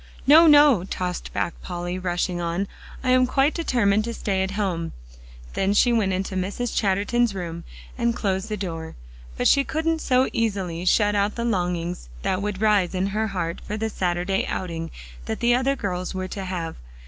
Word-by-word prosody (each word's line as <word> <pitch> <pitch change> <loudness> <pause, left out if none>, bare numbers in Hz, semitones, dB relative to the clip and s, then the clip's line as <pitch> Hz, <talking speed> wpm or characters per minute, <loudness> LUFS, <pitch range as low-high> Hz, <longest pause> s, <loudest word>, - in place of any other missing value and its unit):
"No, 320 +4 +8
no," 290 - +7
tossed 180 -1 -4
back 170 - -1
Polly, 175 0 -4
rushing 175 -1 -1
on, 170 +4 -1 0.4
"I 255 - +2
am 255 0 +5
quite 270 +4 +2
determined 220 -10 +2
to 235 -1 -4
stay 195 -2 -1
at 190 - 0
home." 175 -5 -2 0.6
Then 195 +1 +1
she 245 +3 +4
went 210 -4 +2
into 190 +1 -2
Mrs. 200 +6 -2
Chatterton's 205 +3 +1
room, 170 -2 -5 0.3
and 235 -1 +1
closed 190 0 -1
the 215 - -2
door. 165 - -5 0.4
But - - +2
she 280 - +5
couldn't 320 +2 -1
so 255 0 +3
easily 195 -7 -1
shut 205 +2 +3
out 205 0 +1
the 235 - -2
longings 175 - -2
that 185 - 0
would 205 -1 -3
rise 205 -4 +3
in 185 +1 +1
her 220 +1 0
heart 175 -4 -3
for 210 - -5
the 220 0 -2
Saturday 180 +1 0
outing 165 -3 -4 0.4
that - - -3
the 240 0 +3
other 260 +3 +2
girls 185 -6 -3
were 185 0 -3
to 195 0 -5
have. 175 -3 -4
195 Hz, 185 wpm, -24 LUFS, 180-235 Hz, 0.6 s, No